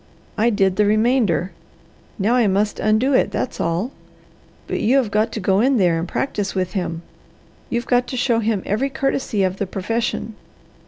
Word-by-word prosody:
I 225 +3 +2
did 195 -4 +1
the 210 -1 +3
remainder. 215 -4 +2 0.7
Now 215 +3 +1
I 245 -3 +3
must 200 +2 0
undo 215 +6 +2
it, - - +3
that's - - -3
all! 170 +9 -1 0.7
But - - -3
you 250 +5 +3
have 240 -6 +1
got 215 +2 +1
to - - -3
go 190 0 +2
in 260 +3 +3
there 175 -5 +2
and 165 - -3
practise 205 -2 -2
with 185 -1 -1
him. 175 -4 -3 0.7
You've 240 0 -2
got 245 0 +2
to 255 - -4
show 240 -2 +2
him 220 -3 -1
every 220 +8 0
courtesy 270 -6 -1
of 185 0 -1
the 200 - -2
profession. 225 +4 -2
215 Hz, 180 wpm, -21 LUFS, 190-240 Hz, 0.7 s, the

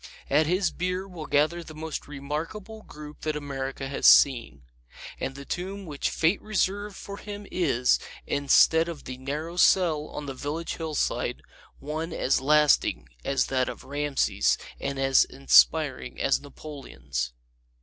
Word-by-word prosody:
At 150 +2 +4
his 180 +1 +1
bier 180 +2 -3
will 170 -5 -8
gather 155 +5 +2
the 155 -1 -11
most 160 0 -5
remarkable 160 +10 -6
group 150 -5 -11
that 155 -1 -2
America 135 -2 -4
has 135 - +1
seen. 115 - +5 0.6
And 135 - -3
the 140 0 -9
tomb 190 +5 -5
which 145 -4 -2
Fate 165 +5 +1
reserved 205 -1 -1
for 200 0 -8
him 205 0 -8
is, 130 -8 +2 0.3
instead 160 +4 +4
of 165 -4 -7
the 130 0 -7
narrow 150 +6 -5
cell 165 -5 +4
on 150 - -7
the 135 - -5
village 150 +5 -4
hillside, 160 -3 -2 0.3
one 155 +3 -4
as 135 - +1
lasting 150 +1 +3
as 140 - +1
that 130 -1 0
of - - -8
Rameses 145 0 +1 0.2
and 140 0 -3
as 135 0 +4
inspiring 140 +2 +3
as 135 - +2
Napoleon's. 70 - -6
150 Hz, 145 wpm, -26 LUFS, 135-170 Hz, 0.6 s, seen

